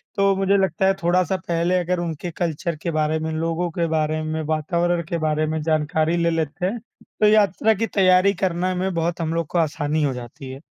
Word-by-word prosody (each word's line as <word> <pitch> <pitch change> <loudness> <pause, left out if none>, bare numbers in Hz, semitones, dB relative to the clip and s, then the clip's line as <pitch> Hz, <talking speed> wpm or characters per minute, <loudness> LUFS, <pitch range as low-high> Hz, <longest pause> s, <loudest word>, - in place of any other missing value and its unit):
तो 195 -1 +3
मुझे 195 +1 +2
लगता 190 -1 +1
है 195 - +4
थोड़ा-सा 180 +1 +2
पहले 170 +2 +1
अगर 180 0 -1
उनके 170 0 -4
कल्चर 170 0 -2
के 170 - -2
बारे 155 0 0
में, 160 0 -3
लोगों 165 +2 -1
के 170 0 -1
बारे 155 0 0
में, 155 0 -3
वातावरण 170 +3 0
के 170 - -1
बारे 155 -1 0
में 155 0 -2
जानकारी 155 +1 +1
ले 170 0 +2
लेते 165 +1 -2
हैं, 225 +5 -2
तो 215 -1 -3
यात्रा 215 +1 +4
की 225 +2 -2
तैयारी 185 0 +4
करना 185 0 0
में 185 +1 -1
बहुत 170 +1 -1
हम 165 0 -1
लोग 165 -2 -1
को 175 - -3
आसानी 155 -1 0
हो 135 -2 +1
जाती 125 +2 -9
है। 135 +2 -9
170 Hz, 210 wpm, -22 LUFS, 155-185 Hz, -, है